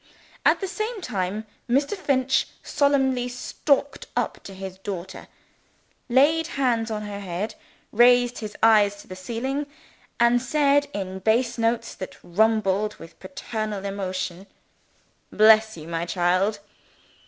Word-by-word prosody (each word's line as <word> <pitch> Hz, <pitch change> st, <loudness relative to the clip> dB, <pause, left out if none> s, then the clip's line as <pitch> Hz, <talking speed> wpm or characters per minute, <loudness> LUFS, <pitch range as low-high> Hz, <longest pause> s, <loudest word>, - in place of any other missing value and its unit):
At -, -, +4 dB
the 385 Hz, -, -2 dB
same 430 Hz, +4 st, -3 dB
time 200 Hz, -, -3 dB, 0.2 s
Mr. 280 Hz, +9 st, +2 dB
Finch 265 Hz, -7 st, +1 dB, 0.2 s
solemnly 265 Hz, -3 st, +2 dB
stalked 275 Hz, +3 st, -1 dB
up -, -, -1 dB
to 195 Hz, -, -9 dB
his 190 Hz, 0 st, -8 dB
daughter; 190 Hz, -2 st, -6 dB, 0.8 s
laid 300 Hz, +6 st, +4 dB
his -, -, -9 dB
hands 240 Hz, -4 st, +1 dB
on 215 Hz, -1 st, -3 dB
her 205 Hz, -1 st, -6 dB
head; 195 Hz, +2 st, -4 dB, 0.4 s
raised 245 Hz, +1 st, +4 dB
his 210 Hz, -2 st, -7 dB
eyes 210 Hz, -2 st, +5 dB
to -, -, -22 dB
the 185 Hz, -, -8 dB
ceiling; 255 Hz, +9 st, -3 dB, 0.5 s
and 235 Hz, +1 st, +4 dB
said 285 Hz, +2 st, +2 dB
in 190 Hz, -5 st, -5 dB
bass 235 Hz, +4 st, +1 dB
notes 230 Hz, 0 st, 0 dB
that 185 Hz, -, -8 dB
rumbled 210 Hz, +1 st, +1 dB
with 165 Hz, 0 st, -14 dB
paternal 215 Hz, -7 st, -5 dB
emotion, 185 Hz, -1 st, -4 dB, 0.8 s
"Bless 220 Hz, 0 st, +5 dB
you, 155 Hz, 0 st, -9 dB
my 170 Hz, 0 st, -3 dB
child!" 185 Hz, +4 st, +1 dB
220 Hz, 130 wpm, -24 LUFS, 195-260 Hz, 0.8 s, eyes